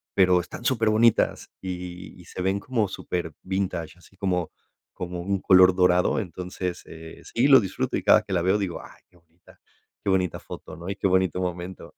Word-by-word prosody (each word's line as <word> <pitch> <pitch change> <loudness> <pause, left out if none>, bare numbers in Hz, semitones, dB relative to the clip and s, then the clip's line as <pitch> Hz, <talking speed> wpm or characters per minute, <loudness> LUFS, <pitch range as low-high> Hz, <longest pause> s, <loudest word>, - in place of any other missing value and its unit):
pero 90 -2 +4
están 120 +7 -10
súper 115 -4 +2
bonitas, 110 +1 +2
y 90 0 -7
y 90 - -14
se 90 - -7
ven 95 +2 0
como 110 -1 -1
super 90 -3 -4
vintage, 90 -3 -3
así 95 +2 -21
como 90 -4 -1 0.4
como 90 -1 -5
un 100 +2 -1
color 95 0 +6
dorado. 90 -1 +3
Entonces, 90 -1 -5
eh, 80 0 -11
sí, 125 +4 +1
lo 135 -2 +8
disfruto, 95 -4 -2
y - - -3
cada - - +5
que - - -6
la 90 - +2
veo 95 +4 +2
digo: 95 -5 -3
"Ay, - - -15
qué - - -27
bonita, 85 0 -23 0.4
qué - - -1
bonita 95 -2 +1
foto, - - -10
¿no? 85 +3 -8
y 100 - -3
qué 100 - -5
bonito 95 -1 +1
momento". 90 0 -5
90 Hz, 195 wpm, -25 LUFS, 90-95 Hz, 0.4 s, lo